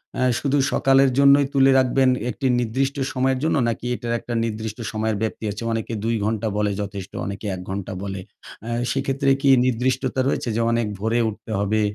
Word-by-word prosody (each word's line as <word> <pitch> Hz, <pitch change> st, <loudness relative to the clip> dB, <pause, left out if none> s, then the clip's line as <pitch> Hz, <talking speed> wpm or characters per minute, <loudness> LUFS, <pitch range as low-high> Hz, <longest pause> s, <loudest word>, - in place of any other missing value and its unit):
অ্যা 130 Hz, -, +1 dB
শুধু 140 Hz, 0 st, 0 dB, 0.2 s
সকালের 135 Hz, +1 st, +4 dB
জন্যই 140 Hz, 0 st, +6 dB
তুলে 135 Hz, -1 st, +5 dB
রাখবেন 130 Hz, 0 st, +3 dB, 0.2 s
একটি 130 Hz, +3 st, -2 dB
নির্দিষ্ট 130 Hz, +4 st, -1 dB, 0.2 s
সময়ের 130 Hz, 0 st, +1 dB
জন্য? 160 Hz, -, +2 dB
নাকি 115 Hz, -, -4 dB
এটার 120 Hz, -1 st, -3 dB
একটা 120 Hz, -, -6 dB
নির্দিষ্ট 110 Hz, -1 st, -4 dB
সময়ের 110 Hz, -1 st, -1 dB
ব্যাপ্তি 110 Hz, -, -3 dB
আছে? 105 Hz, +3 st, -6 dB
অনেকে 115 Hz, +1 st, -3 dB
২ 115 Hz, +1 st, 0 dB
ঘন্টা 110 Hz, 0 st, -1 dB
বলে 105 Hz, -1 st, +1 dB
যথেষ্ট, 100 Hz, -2 st, -6 dB
অনেকে 100 Hz, +2 st, -6 dB
১ 90 Hz, -, -8 dB
ঘন্টা 100 Hz, 0 st, -4 dB
বলে। 100 Hz, -1 st, -4 dB, 0.4 s
অ্যা 115 Hz, -, -5 dB, 0.2 s
সেক্ষেত্রে 135 Hz, +1 st, 0 dB
কি 140 Hz, -, +3 dB, 0.2 s
নির্দিষ্টতা 130 Hz, +1 st, 0 dB
রয়েছে? 130 Hz, -, -1 dB
যে 115 Hz, -, +1 dB
অনেক 115 Hz, -2 st, +1 dB
ভোরে 115 Hz, +3 st, 0 dB
উঠতে 110 Hz, +1 st, -9 dB
হবে, 105 Hz, +2 st, +1 dB
115 Hz, 180 wpm, -22 LUFS, 110-135 Hz, 0.4 s, জন্যই